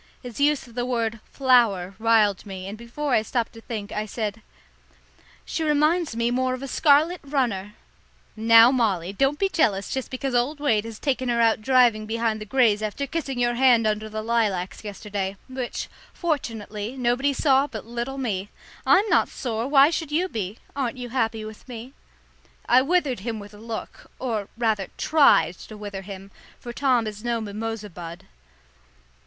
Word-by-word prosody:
His 245 0 -8
use 290 0 +2
of 235 - -16
the 245 +1 -2
word 230 -2 -1
"flower" 230 -9 +3
riled 220 -3 +3
me, 190 -2 -7
and 200 - -6
before 240 +5 -4
I 220 - +4
stopped 230 +1 -2
to 225 - -12
think, 215 -3 -6
I 210 +1 -3
said, 215 0 -4 1.0
"She 325 - -3
reminds 305 -1 +2
me 235 +1 0
more 255 +1 0
of 255 - -9
a - - -4
scarlet 310 +5 +3
runner." 235 -8 -1 0.6
"Now, 230 +2 +7
Molly, 200 -8 0
don't 275 +7 +1
be 390 - +2
jealous 205 - +1
just 265 -1 -3
because 260 0 -3
old 250 +5 +1
Wade 225 -8 +1
has 225 -1 -7
taken 260 -2 -1
her 235 -1 +1
out 225 -1 +3
driving 235 -3 +3
behind 225 -1 -1
the - - -5
greys 220 -3 +3
after 215 +6 -2
kissing 275 -3 -4
your 240 0 +2
hand 240 -2 +4
under 215 0 -1
the 215 0 -4
lilacs 215 -6 -1
yesterday, 200 -1 -4
which, 255 -2 -4 0.3
fortunately, 230 - -3
nobody 250 +3 +1
saw 275 0 +3
but 220 -7 -8
little 240 +3 -4
me! 205 -7 -2 0.4
I'm 400 +3 +5
not - - +3
sore, 230 -2 -3
why 280 +2 +6
should 320 -3 -3
you 345 +5 +1
be? 210 - -4 0.2
Aren't 260 -3 -2
you 245 -1 -6
happy 225 -3 -1
with 215 +3 -11
me?" 245 +2 -8 0.7
I 250 +1 +6
withered 290 - +1
him 225 +3 -4
with 205 0 -10
a - - -12
look, 225 0 -7
or 220 -6 -3
rather 220 -4 0
tried 180 - +4
to 215 - -10
wither 205 -2 -6
him, 195 0 -10 0.3
for 240 - -8
Tom 250 -3 +2
is 215 0 -6
no 235 -1 0
mimosa 215 0 -5
bud. 170 0 -9
235 Hz, 175 wpm, -24 LUFS, 215-265 Hz, 1.0 s, Now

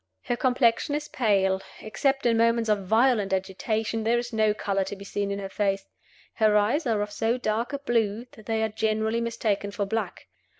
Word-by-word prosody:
Her 245 - -1
complexion 250 +3 +2
is 295 0 -4
pale: 195 -5 +1 0.2
except 270 +6 -1
in 235 -1 +4
moments 230 -1 +2
of 200 -3 -1
violent 220 -2 +3
agitation 215 +4 -1
there 230 +2 +2
is 240 0 -4
no 215 -1 +3
color 200 -2 -1
to 205 - -5
be 200 0 -11
seen 200 0 -2
in 200 - -2
her 195 -1 -4
face. 195 0 -1 0.5
Her 215 -2 +3
eyes 240 +9 +1
are 215 -3 +1
of 205 - -6
so 225 +3 0
dark 230 0 -1
a 280 - -2
blue 230 -4 0
that 215 - -16
they 220 0 0
are 220 - +1
generally 220 +1 0
mistaken 220 -3 -1
for 200 0 -2
black. 225 +3 -3
220 Hz, 200 wpm, -26 LUFS, 205-235 Hz, 0.5 s, in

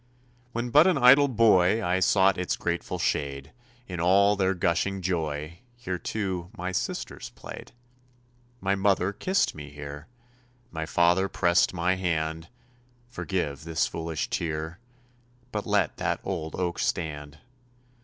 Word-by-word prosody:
When 120 +1 -3
but 150 +6 +7
an 180 -5 +3
idle 135 +2 +7
boy, 110 -4 +4
I 90 +1 +1
sought 95 +1 +4
its 90 - -1
grateful 85 0 -3
shade; 70 -2 -2 0.4
In 90 -2 -5
all 100 +4 +4
their 95 -1 +1
gushing 90 +3 0
joy 80 -2 -2 0.2
Here, 95 -7 -4
too, 95 -5 -3
my 90 +1 -3
sisters 90 - -4
played. - - -10 0.9
My 95 +1 +1
mother 100 -1 +1
kissed 190 - +1
me 75 -1 -9
here; 75 +1 -9 0.6
My 80 -1 -4
father 90 +3 +3
pressed 85 -2 +3
my 90 +1 0
hand 80 -2 -2 0.6
Forgive 90 - -3
this 80 -1 0
foolish 80 -1 -3
tear, 80 +2 -3 0.7
But 105 -2 -4
let - - +1
that - - -1
old 80 0 -4
oak 90 -2 -2
stand. 75 -2 -3
90 Hz, 135 wpm, -27 LUFS, 80-100 Hz, 0.9 s, but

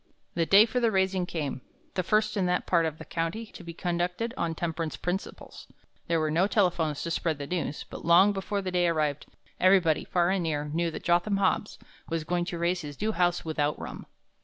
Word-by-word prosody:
"The 165 -1 0
day 200 +2 +8
for 250 +2 -1
the 235 -2 +3
raising 190 -2 +1
came, 145 -7 -3 0.3
the 185 - 0
first 215 +4 +1
in 190 -3 +1
that 180 0 0
part 170 -2 +3
of 155 -1 -5
the - - -10
country 165 +7 -3
to - - -10
be 170 - -7
conducted 180 +7 -2
on 165 -7 -2
temperance 165 -1 -3
principles. 180 +2 -5 0.4
There 165 -1 +2
were 155 -1 0
no 175 +5 +3
telephones 175 -8 +1
to 170 - -3
spread 165 -2 0
the 145 - -5
news, 160 -2 -3
but - - -9
long 175 +5 +6
before 200 +1 -3
the 185 - -3
day 180 -1 +2
arrived, 155 -3 0 0.3
everybody, 185 -4 +4
far 175 0 +1
and 195 -1 +1
near, 150 -3 -1
knew 165 +3 -1
that 160 - -7
Jotham 175 +3 +2
Hobbs 200 +1 0 0.3
was 165 -1 -1
going 175 +2 -1
to 175 - -4
raise 175 +2 0
his 145 -3 -8
new 220 +1 0
house 175 -4 +1
without 150 -2 0
rum. - - -8
175 Hz, 210 wpm, -28 LUFS, 160-190 Hz, 0.4 s, day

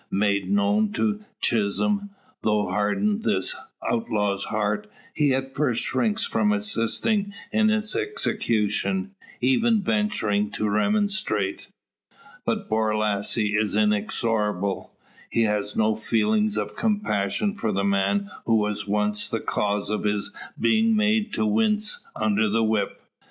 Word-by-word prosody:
Made 100 0 0
known 205 +1 +2
to 215 -1 -1 0.2
Chisholm, 200 - +1 0.3
though 105 -1 +1
hardened 200 - 0
this 95 - 0 0.3
outlaw's 105 -4 0
heart, 105 -1 -1 0.2
he 150 -3 +2
at 135 0 -2
first 130 -5 +1
shrinks 220 -2 +1
from 110 -2 +1
assisting 115 - 0 0.2
in 215 0 +3
its 215 0 0
execution 190 - -1 0.3
even 210 - +3
venturing 110 - +1
to 105 +1 -1
remonstrate. 110 - 0 0.8
But - - -1
Borlasse 110 -1 0
is 105 -1 +1
inexorable. 105 -1 0 0.4
He 115 - +2
has 105 -1 -1
no 110 0 +3
feelings 205 - +1
of - - -3
compassion 205 - 0
for 115 - -2
the 100 0 0
man 100 - +1 0.2
who 115 - +4
was 105 -1 0
once 105 0 0
the - - -1
cause 105 0 -1
of 105 - -2
his 105 -1 -1 0.3
being 220 - +3
made 215 +1 +2
to - - 0
wince 215 0 +1
under 110 0 +1
the 115 +2 +2
whip. 110 -2 -1
110 Hz, 125 wpm, -24 LUFS, -, 0.8 s, who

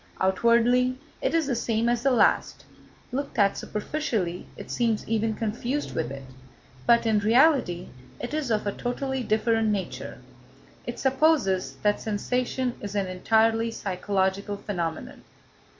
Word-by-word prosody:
Outwardly 235 +6 +3 0.2
it - - 0
is 325 -2 +2
the 275 - -1
same 230 0 0
as 240 -1 +1
the 275 - +3
last; 235 -5 +2 0.5
looked 280 +1 -4
at 200 -2 +4
superficially 210 - -3
it - - -8
seems 230 -3 0
even 225 0 0
confused 235 +6 -2
with 160 - -2
it; 135 0 -7 0.6
but, 235 0 +5
in 220 -2 +3
reality 225 - +3 0.3
it 245 - -5
is 305 -4 -1
of 215 -2 0
a 205 - 0
totally 265 +4 -3
different 225 0 +1
nature. 200 -3 -3 0.7
It - - -4
supposes 265 - +2
that 205 0 +2
sensation 250 +4 -1
is 205 0 -6
an 200 -1 +1
entirely 225 +5 +2
psychological 200 -1 -1
phenomenon. 170 -6 -4
225 Hz, 135 wpm, -26 LUFS, 200-250 Hz, 0.7 s, but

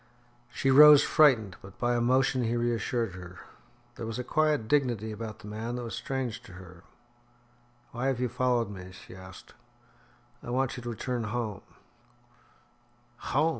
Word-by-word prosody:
She 135 - 0
rose 150 +1 +9
frightened, 120 - +3
but 95 0 -14
by 120 0 0
a 120 - +1
motion 130 +1 +2
he 115 +1 -1
reassured 120 -2 -1
her. 90 -1 -10 0.6
There 115 - -5
was 115 - -5
a 125 - -3
quiet 150 -4 +1
dignity 120 -6 0
about 110 0 -7
the - - -13
man 110 +3 -5
that 125 - -5
was 115 - -6
strange 130 -4 -4
to - - -14
her. 90 -1 -13 1.1
"Why 125 +2 -3
have 135 -3 0
you 125 - 0
followed 125 -2 0
me?" 95 -1 -10
she 95 - -13
asked. 95 0 -13 0.9
"I - - -9
want 130 +1 -1
you 125 - -7
to 120 - -6
return 120 0 -3
home." 110 -3 -4 1.6
"Home!" 150 +6 +1
120 Hz, 165 wpm, -28 LUFS, 105-130 Hz, 1.6 s, rose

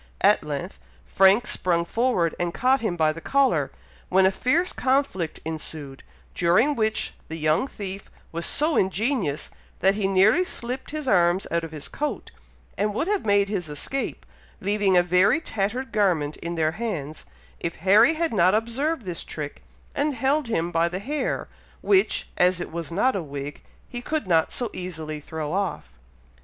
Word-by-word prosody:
At - - +4
length 65 - -5 0.3
Frank 195 +4 +4
sprung 170 -2 +1
forward 225 -6 +1
and 175 -1 -2
caught 260 +2 +3
him 215 -6 -1
by 155 -2 +2
the 165 - -9
collar, 275 +5 +2 0.4
when 190 +1 +4
a 190 - +5
fierce 315 - +1
conflict 260 - 0
ensued, 155 -3 -5 0.3
during 185 +12 +3
which 220 -4 0
the 160 - -6
young 155 - +1
thief 195 -5 -7 0.2
was 170 +1 -2
so 305 +1 +2
ingenious, 190 - 0 0.3
that 190 +2 +5
he 200 -1 0
nearly 195 - +4
slipped 250 -6 -5
his 305 -2 -5
arms 180 -2 +3
out 170 0 0
of 165 - -5
his 150 -3 -6
coat, 300 0 -4 0.5
and 205 0 0
would 315 - 0
have 405 - -1
made 200 -1 +4
his 190 -6 -3
escape, 210 - -4 0.3
leaving 200 -1 +2
a 175 - +5
very 180 - +4
tattered 245 -1 -3
garment 175 -9 +1
in 170 +1 -5
their 160 -1 +1
hands, 170 -7 -5 0.3
if 170 - -3
Harry 210 - +5
had 330 -4 -1
not 185 -1 +4
observed 240 +5 -1
this 175 -2 -4
trick, 150 -2 -6 0.3
and 290 -1 0
held 270 +3 +1
him 175 -6 -1
by 165 0 +2
the 180 - -4
hair, 280 +10 -2 0.3
which, 390 0 +2
as 180 0 +4
it 175 - -5
was 170 -1 -5
not 250 +9 +2
a 195 - -1
wig, 145 -1 -7 0.3
he 245 - -6
could 310 0 -2
not 165 -3 +3
so 240 -4 -3
easily 160 -4 -5
throw 155 +1 -5
off. 185 - -2
190 Hz, 170 wpm, -25 LUFS, 170-245 Hz, 0.5 s, a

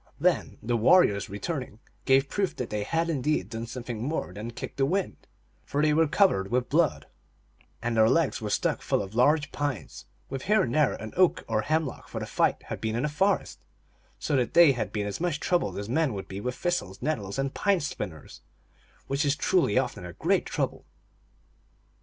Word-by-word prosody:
Then - - +1
the 120 +2 0
warriors, 110 - +4
returning, 125 - -4 0.3
gave 135 +1 +4
proof 195 +4 -1
that 125 - -5
they 105 -1 -1
had 165 +9 0
indeed 150 -1 0
done 115 0 -5
something 120 -2 -6
more 135 - -3
than 105 +4 -6
kick 120 - -7
the 135 - +2
wind, 190 +4 -2 0.4
for 145 - -3
they 150 0 +3
were 160 +1 +4
covered 145 - +2
with 125 +1 0
blood, 160 -1 +2 0.8
and 120 0 -1
their 110 0 +5
legs 165 -2 +1
were 105 - -3
stuck - - 0
full - - 0
of 95 +1 -9
large 145 +6 +3
pines, 145 -6 -4 0.2
with 135 0 -6
here 215 +1 +4
and 120 - -2
there 150 -2 +3
an 110 - -7
oak 185 -1 +3
or 110 -1 +1
hemlock, 155 +3 -2
for - - -5
the - - -4
fight - - +1
had - - -6
been 110 0 -1
in 120 +5 0
a - - 0
forest; 190 +6 0 0.5
so - - -1
that 125 -2 -1
they 170 -4 +8
had 110 -6 -3
been 105 -1 -2
as 105 +8 -4
much 170 -4 0
troubled 175 -1 0
as 100 0 -4
men 140 +1 +1
would 95 - -6
be 95 +1 -6
with 125 +2 -3
thistles, 175 - -2
nettles, 110 -9 -2
and 135 0 -1
pine 200 -2 +2
splinters, 100 - -6 0.6
which 140 +2 0
is 145 0 +2
truly 165 - +2
often 125 -7 -1
a 90 -1 -8
great - - +1
trouble. - - -2
135 Hz, 200 wpm, -27 LUFS, 110-160 Hz, 0.8 s, they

